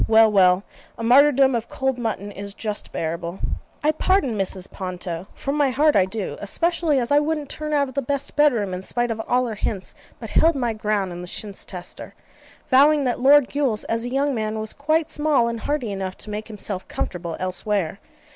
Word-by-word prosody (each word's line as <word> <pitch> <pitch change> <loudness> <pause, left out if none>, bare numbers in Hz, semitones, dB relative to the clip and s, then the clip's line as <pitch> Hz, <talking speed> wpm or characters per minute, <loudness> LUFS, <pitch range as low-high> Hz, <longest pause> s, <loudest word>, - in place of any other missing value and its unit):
Well, 220 0 +6
well: 185 -1 +4 0.3
a 230 - -5
martyrdom 270 +2 +5
of 235 -1 -2
cold 265 -2 -1
mutton 210 -3 -3
is 200 0 -7
just 210 -2 -4
bearable. 170 +2 -4 0.4
I 305 - +4
pardon 310 - +1
Mrs. 190 -2 -2
Ponto, 180 -1 -5
from 275 +1 -3
my 290 -2 +3
heart 295 +4 +3
I 190 - +5
do, 195 +1 -4
especially 330 - +1
as 245 +1 -1
I 290 - +6
wouldn't 300 -1 -2
turn 305 0 -5
out 285 -2 +2
of 260 - -10
the 280 - 0
best 280 +2 -3
bed 295 0 +5
room, 205 -6 -2
in 180 - -4
spite 240 +4 0
of 225 0 -3
all 250 +1 +2
her 230 - -3
hints; 200 -2 -3 0.3
but - - -8
held 330 -1 +4
my 240 -4 0
ground 210 -3 -1
in 175 0 -7
the 180 - -8
chintz 200 +2 -5
tester, 180 -1 -7 0.6
vowing 285 +3 +6
that 250 -2 -1
Lord 275 +1 +6
Gules, 270 -7 0
as 230 0 -1
a 245 - -3
young 275 +2 +1
man, 215 -2 -2
was 215 0 -2
quite 310 +2 +1
small 295 -6 +2
and 230 -1 -3
hardy 265 -4 -2
enough 190 -1 -4
to 210 - -7
make 210 +1 -5
himself 205 -3 -5
comfortable 170 -2 -4
elsewhere. 185 0 -2
230 Hz, 205 wpm, -23 LUFS, 195-280 Hz, 0.6 s, Well